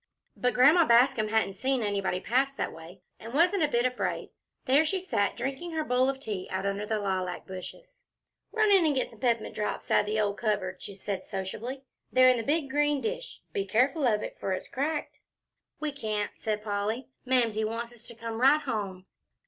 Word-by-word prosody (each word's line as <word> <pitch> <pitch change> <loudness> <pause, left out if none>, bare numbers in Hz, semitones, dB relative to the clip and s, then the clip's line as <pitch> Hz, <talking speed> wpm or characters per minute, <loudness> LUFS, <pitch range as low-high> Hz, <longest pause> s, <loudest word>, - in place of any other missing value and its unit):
But 250 0 0
Grandma 300 +8 +7
Bascom 235 -1 +5
hadn't 220 -2 +1
seen 260 +4 0
anybody 200 -3 0
pass 260 +7 +1
that - - -3
way, 170 +3 -12 0.2
and 230 +3 -8
wasn't 360 +5 +4
a 305 - +4
bit 240 -3 +1
afraid. 250 0 -2 0.3
There 280 +3 +5
she 375 +5 0
sat, 205 - 0
drinking 275 +7 -4
her 315 -1 0
bowl 255 -1 +2
of 270 0 -3
tea 205 -8 -4
out 190 +1 -2
under 200 +1 -2
the 220 - 0
lilac 185 -3 -2
bushes. - - -10 0.5
"Run 435 -2 +3
in 385 -3 +6
an' 305 -3 +2
get 255 - 0
some 225 - -16
pep'mint 230 -2 0
drops 210 0 -3
out 210 - +3
o' 215 -1 +2
the - - -8
cupboard," 200 -4 -2
she 200 - -7
said 195 -1 -4
sociably, 220 +7 -5 0.3
"they're 255 0 +7
in 250 - +1
the 230 - -2
big 290 +1 0
green 295 0 +2
dish. - - -5
Be 200 - 0
careful 255 - +2
of 210 -2 +2
it, - - -7
for 190 - -1
it's 185 - -4
cracked." 295 +3 -3 0.6
"We 305 -1 -1
can't," 215 -7 -3
said 210 -1 -3
Polly, 210 +5 -2
"Mamsie 235 -4 +2
wants 230 +2 -3
us 240 -1 -12
to 235 - -9
come 230 0 -5
right 285 +4 +6
home." 195 -6 -4
235 Hz, 200 wpm, -28 LUFS, 205-275 Hz, 0.6 s, Grandma